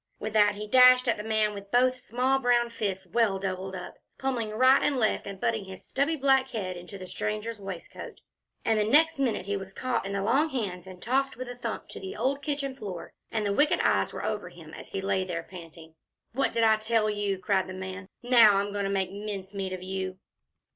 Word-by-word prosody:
With 215 0 -5
that 205 -1 +4
he 210 +1 -6
dashed 250 +2 +7
at - - +2
the 210 - -5
man 215 -1 +1
with 200 -1 -9
both 255 +2 +3
small 250 +2 +1
brown 240 -2 +2
fists 195 -4 -3
well 205 +1 +1
doubled 190 0 -4
up, 180 - -8 0.2
pommelling 255 -5 -2
right 255 +5 +5
and 280 - +1
left, 220 -4 0
and 195 -1 -7
butting 220 -2 -1
his 190 -1 -10
stubby 285 +4 0
black 270 -2 +3
head 190 -7 -4
into 180 +3 -9
the 185 - -8
stranger's 215 +3 -4
waistcoat. 195 -3 -8 0.5
And 220 -1 +3
the - - +3
next 300 +7 +4
minute 245 -8 0
he 200 0 -1
was 195 0 -6
caught 255 +1 -1
in 200 - -4
the 200 -1 -1
long 270 +9 +2
hands 190 - -4
and 185 -1 -11
tossed 270 0 0
with 255 0 -6
a 245 - -6
thump 245 - -5
to - - -8
the 385 +1 -7
old 275 +2 -1
kitchen 280 -1 -2
floor, 200 -9 -7 0.2
and 215 -1 -1
the 200 - +1
wicked 295 +8 +3
eyes - - +2
were - - -5
over - - -3
him - - -13
as - - -10
he 195 - -3
lay 190 -1 0
there 170 -3 -4
panting. 165 -3 -12 0.4
"What 270 +3 +1
did 230 - +2
I 220 -1 +5
tell 220 0 +1
you!" 205 -2 -1
cried 190 0 0
the 185 - -7
man. 190 +1 -7
"Now 230 -5 +7
I'm 200 +1 -1
going 200 -1 -1
to - - -1
make 190 -2 -1
mincemeat 200 -1 -5
of 185 -1 -5
you." 190 0 -4
210 Hz, 225 wpm, -28 LUFS, 190-250 Hz, 0.5 s, dashed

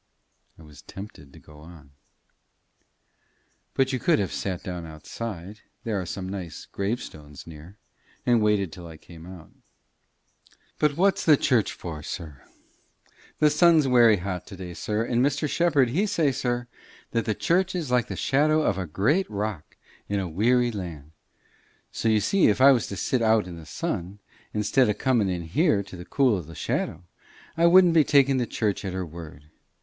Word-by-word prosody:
I 80 - -15
was 75 -2 -15
tempted 95 -8 -11
to - - -16
go 75 -1 -16
on. 75 -3 -15 1.8
"But 135 0 +1
you 130 - -1
could 165 +3 +3
have 100 - -2
sat 95 -3 -4
down 90 -2 -5
outside 90 +5 -8 0.2
there 110 -5 -2
are 90 - -7
some 95 +1 -5
nice 95 -4 -7
gravestones 95 - -6
near 80 +5 -12 0.5
and 120 -2 +3
waited 105 -4 +1
till 85 -2 -10
I 80 -1 -11
came 85 +1 -14
out." 90 -4 -12 1.3
"But 150 -1 +1
what's 195 +2 +2
the 155 -3 +6
church 125 -7 +1
for, 80 -3 -7
sir? 75 -3 -7 1.0
The 150 -1 +4
sun's 155 -1 +4
werry 120 -4 +5
hot 90 -1 -5
to 100 - -9
day, 90 -2 -8
sir; 105 +6 -2
and 120 +1 +1
Mr. 145 +2 0
Shepherd, 145 -6 +2
he 185 - 0
say, 165 -8 +1
sir, 120 -1 -2 0.4
that 115 -1 -1
the 110 - -1
church 185 - +1
is 160 -8 -3
like 125 -2 +2
the - - -5
shadow 155 +3 +2
of - - 0
a 90 - -4
great 140 - +1
rock 105 -6 -5 0.3
in 100 0 0
a 95 - -3
weary 120 +8 +2
land. 85 -8 -7 0.8
So, 115 - -1
you 110 -1 +3
see, 195 - +3
if 105 - +2
I 135 +2 +8
was 125 -4 +1
to 100 - -6
sit 125 +7 0
out 110 -2 +3
in 90 -1 -8
the 80 -2 -12
sun, 90 +6 -4 0.3
instead 105 +4 +2
of 105 - -1
comin' 120 -7 +1
in 90 -2 -3
here 100 - +1
to 95 -1 -12
the 85 -1 -9
cool 130 -2 +2
o' - - -4
the 80 +1 -12
shadow, 90 - -3 0.5
I 170 +1 +4
wouldn't 180 0 +6
be 160 -2 +6
takin' 140 -2 +3
the 120 -2 -1
church 105 -3 -2
at 95 -2 -4
her 95 -1 -3
word. 75 -3 -11
105 Hz, 185 wpm, -25 LUFS, 85-130 Hz, 1.8 s, I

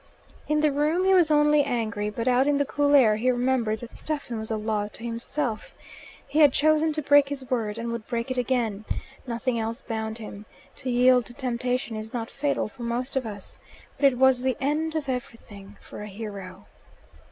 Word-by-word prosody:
In 300 0 +2
the 305 -1 +3
room 305 +6 +1
he 385 - +5
was 350 -4 +5
only 295 -1 +4
angry, 220 -4 -2
but 230 +3 -4
out 255 +2 +4
in 290 -1 +3
the 285 - +1
cool 290 +1 +2
air 220 -6 +6
he 245 +4 +1
remembered 245 -3 +1
that 240 - -8
Stephen 285 -7 -4
was 220 - -6
a 220 - -1
law 210 -1 -1
to 210 +2 -9
himself. 235 +1 -3 0.5
He 305 - 0
had 290 -4 +7
chosen 310 +1 +3
to 310 0 -3
break 285 0 +5
his 270 -2 -6
word, 220 -4 -1
and 235 0 -3
would 235 -2 -5
break 235 +1 -3
it 255 - -2
again. 235 -5 -1 0.4
Nothing 235 0 -1
else 225 +3 -4
bound 220 -1 -4
him. 210 -2 -9 0.3
To 260 - -4
yield 250 0 +4
to 240 - -12
temptation 250 -2 -2
is 215 +2 -6
not 230 -1 -4
fatal 280 0 -1
for 240 +3 -14
most 240 +3 -2
of 260 -3 0
us. 200 -2 -8 0.4
But 285 - +3
it 250 - -6
was 260 -1 +4
the 260 -1 0
end 310 +4 -1
of 305 -3 -2
everything 230 -6 -7
for - - -10
a 210 - -6
hero. 200 -2 -8
245 Hz, 205 wpm, -26 LUFS, 220-280 Hz, 0.5 s, had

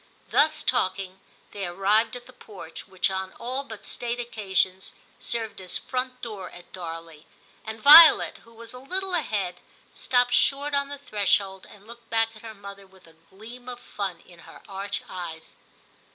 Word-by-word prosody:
Thus 305 +1 +3
talking 190 0 -1 0.3
they 200 -3 -4
arrived 205 +6 +2
at 245 0 -9
the 255 - -15
porch, 195 -9 -11
which 190 0 0
on 190 0 -4
all 255 +3 -4
but 220 -7 -10
state 240 0 -3
occasions 190 -5 -1 0.3
served 225 -4 -3
as 185 -2 -3
front 255 0 -4
door 215 -5 -6
at 175 - -15
Darley, 165 -3 -8 0.4
and 220 0 -7
Violet, 310 +6 +9
who 230 - -20
was 230 0 -8
a 250 - -9
little 375 +8 -3
ahead, 200 - -1 0.3
stopped 245 -1 +2
short 285 +3 +2
on 280 0 +1
the 285 - -6
threshold, 200 -6 0
and 205 -1 -16
looked 235 0 -13
back 225 0 +1
at 215 - -14
her 225 -1 -9
mother 200 -1 -11
with 190 -1 -21
a 165 - -19 0.2
gleam 235 +6 -11
of 245 -1 -7
fun 195 -7 -5
in 175 -2 -17
her - - -14
arch 200 +1 -4
eyes. 165 -3 -7
215 Hz, 170 wpm, -26 LUFS, 190-245 Hz, 0.4 s, Violet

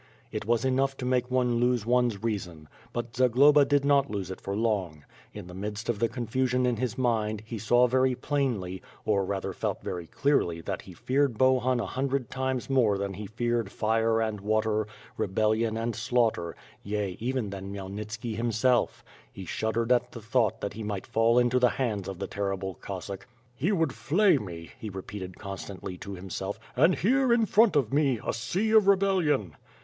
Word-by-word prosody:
It - - -4
was 120 +2 +2
enough 135 +1 +1
to 125 - -4
make 125 -1 +1
one 125 -2 +2
lose 120 -2 +1
one's 120 -4 +1
reason. 90 -9 -3 0.2
But 120 +1 -5
Zagloba 135 +4 +5
did 140 0 +2
not 140 -1 +3
lose 100 -3 -4
it 95 - -8
for 100 - -3
long. 100 -9 -1 0.3
In - - -8
the 90 - -11
midst 105 +4 -5
of 115 -4 0
the'confusion 125 +2 0
in 125 -2 +1
his 120 -1 -2
mind, 110 -4 0
he 115 0 -6
saw 120 +4 +4
very 130 +1 +2
plainly, 120 -10 -2 0.2
or 100 -2 +2
rather 95 0 -3
felt - - -3
very 85 -2 -4
clearly 115 - +1
that - - -4
he - - -12
feared 135 -3 0
Bohun 130 0 +3
a 115 - -1
hundred 135 +2 -2
times 130 -1 -2
more 120 -7 +3
than 100 0 -3
he 100 +2 -6
feared 115 -1 -1
fire 110 +1 +1
and 110 -2 -1
water, 110 0 +1 0.3
rebellion 110 +2 +1
and 115 +1 -2
slaughter, 110 -7 0 0.3
yea, 100 -2 -2
even 120 -3 -2
than 95 0 -6
Khmyelnit 100 +2 -6
ski 110 +1 -4
himself. 115 +2 +1 0.3
He 95 - -9
shuddered 115 +5 -1
at 125 0 +2
the 115 - -7
thought 115 -2 +1
that 100 - -3
he 110 - -7
might 105 -3 -4
fall 115 +2 +3
into 125 +1 +4
the 125 -1 +5
hands 110 -8 -2
of 95 -2 -5
the 100 - -3
terrible 95 -1 -3
Cossack. 95 +2 -7 0.3
"He 155 - 0
would 165 -8 +1
flay 155 - +3
me," 85 -5 -8
he 110 - -5
repeated 95 -1 -7
constantly 95 -2 -7
to 100 - -7
himself, 95 +2 -5 0.2
"and 160 +8 +5
here, 260 +4 +2
in 235 -1 +4
front 215 -2 +4
of 135 -5 +1
me, 140 -5 +2
a - - 0
sea 180 - -1
of 215 -3 +6
rebellion!'' 185 - +2
115 Hz, 185 wpm, -28 LUFS, 100-130 Hz, 0.3 s, of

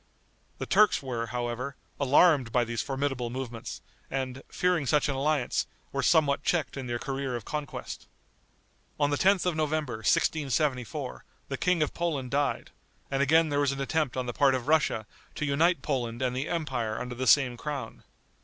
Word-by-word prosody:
The - - -4
Turks 215 -8 +4
were, 120 -3 -3
however, 125 +3 -3 0.2
alarmed 140 -2 +4
by 125 0 +3
these 115 0 -2
formidable 135 -3 -2
movements, 120 -2 -6 0.3
and, 130 -1 -3
fearing 180 -6 +1
such 150 +3 +3
an 140 - 0
alliance, 140 -1 0 0.2
were - - -1
somewhat 145 -3 +3
checked 160 -7 0
in 135 -2 -5
their 120 0 -1
career 135 0 -3
of 120 - -6
conquest. 150 -1 -5 0.9
On 145 -1 +2
the - - +2
10th 190 +4 +3
of 180 -3 +1
November, 155 -5 -1
1674, 135 +2 0 0.3
the 135 - -2
King 180 0 +2
of 150 - -3
Poland 145 -7 -2
died, 145 +1 0 0.4
and 135 0 +1
again 160 +3 +4
there 145 0 +1
was 140 -1 +2
an 135 - -6
attempt 140 -1 -1
on 130 - -1
the 120 - -4
part 135 0 +4
of 130 0 -4
Russia 150 -8 +2 0.3
to 150 - -2
unite 165 +5 +2
Poland 120 -4 -2
and 125 -1 0
the 135 +4 -2
empire 130 -10 -2
under 125 0 -5
the 130 +1 -3
same 135 -4 +5
crown. 140 +2 -6
135 Hz, 175 wpm, -28 LUFS, 125-150 Hz, 0.9 s, same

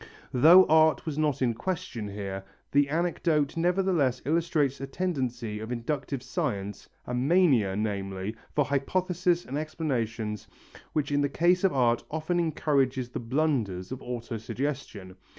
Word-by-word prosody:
Though 165 +9 +8
art 160 0 +4
was 155 -2 -3
not 150 -4 +1
in 120 -2 +2
question 120 - -4
here, 100 -1 -5 0.3
the 140 0 +3
anecdote 160 -2 0
nevertheless 170 -7 +1
illustrates 150 -3 +1
a 135 - -4
tendency 125 -9 -3
of 110 +2 -6
inductive 130 +2 -3
science, 105 -5 -3 0.2
a 125 - -5
mania, 130 - +3
namely, 100 -1 -3 0.2
for 145 - +3
hypothesis 175 +5 0
and 140 +3 -3
explanations 115 - -3 0.5
which 145 -2 -1
in 145 0 +2
the 145 - +1
case 175 +5 +2
of 190 - +4
art 120 -3 +2
often 160 +3 -1
encourages 140 -6 0
the - - -5
blunders 120 - -1
of 130 - -5
auto 120 -2 -5
suggestion. 110 -7 -5
135 Hz, 140 wpm, -28 LUFS, 115-160 Hz, 0.5 s, Though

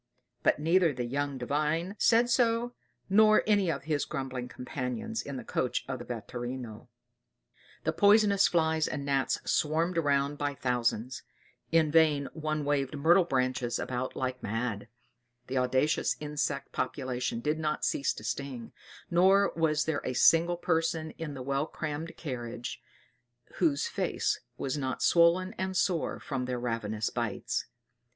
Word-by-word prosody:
But - - +3
neither 165 +1 +3
the 125 -1 -3
young 140 +2 -2
Divine 150 +8 -1
said 235 +1 +4
so, 240 0 +2 0.3
nor 215 +2 +5
anyone 200 -6 +2
of 140 - -9
his 150 -1 0
grumbling 130 -2 -4
companions 140 - -4
in 140 -2 -6
the - - -6
coach 125 - -1
of 130 -2 -4
the 120 - -8
vetturino. 120 0 -6 1.0
The - - 0
poisonous 205 -1 +5
flies 160 -2 +1
and 140 -2 -4
gnats 135 -1 +1
swarmed 165 +3 +1
around 145 -1 +1
by 145 -1 -1
thousands; 125 -1 -1 0.5
in 160 -2 +3
vain 150 -3 +4
one 155 -2 -2
waved 145 0 0
myrtle 170 +5 +5
branches 130 -4 0
about 130 0 -3
like 130 -1 -3
mad; 115 -1 -3 0.6
the 130 +1 -1
audacious 130 +4 +1
insect 145 -2 -3
population 125 -2 -2
did 150 +6 -1
not 150 -1 -1
cease 140 - +1
to - - -10
sting; 130 -4 -4 0.4
nor 190 +3 +4
was 155 -2 +1
there 160 -2 -1
a 130 - -2
single 170 +6 +4
person 165 -2 0
in 155 -3 -5
the 130 - -6
well 140 +3 -1
crammed 155 +1 -5
carriage 120 -5 -5 0.8
whose 320 +6 +2
face - - -1 0.2
was 135 +2 -2
not 130 -2 -2
swollen 175 +3 +4
and 190 0 -2
sore 175 -3 0
from 135 -3 -3
their 125 -1 -3
ravenous 110 -3 -2
bites. - - -2
145 Hz, 145 wpm, -29 LUFS, 130-165 Hz, 1.0 s, nor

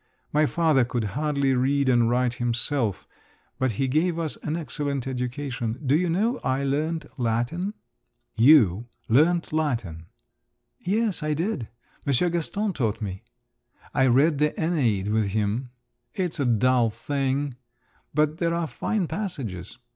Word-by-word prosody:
My 150 0 +4
father 160 -6 +3
could 120 -1 -2
hardly 140 -1 +1
read 135 +2 +2
and 120 -2 +4
write 125 0 +1
himself, 120 -2 -1 0.5
but 130 -3 +1
he 135 +6 0
gave 160 +6 +1
us 165 -3 -2
an 155 - -3
excellent 140 -3 -3
education. 125 -2 -3
Do 135 +2 +3
you 175 +2 +1
know, 215 +9 +1
I 130 +1 0
learnt 155 +3 -1
Latin!" 120 - -1 0.6
"You? 115 - +5 0.2
learnt 160 +8 +3
Latin?" 115 - -2 0.7
"Yes; 210 +1 0
I 150 0 0
did. 165 - -2 0.4
Monsieur 140 +6 +2
Gaston 195 +5 -1
taught 115 -7 -1
me. 95 -3 -5 0.7
I 130 -2 +3
read 140 +4 +4
the 150 0 +3
Æneid 120 - 0
with 105 -3 +1
him. 110 +4 -1 0.5
It's 180 -6 -2
a 140 - +1
dull 120 +1 +3
thing, 140 +2 -2 0.6
but 155 +2 +1
there 170 -1 +1
are 170 -1 0
fine 200 +5 -1
passages. 135 - -5
140 Hz, 140 wpm, -25 LUFS, 120-160 Hz, 0.7 s, You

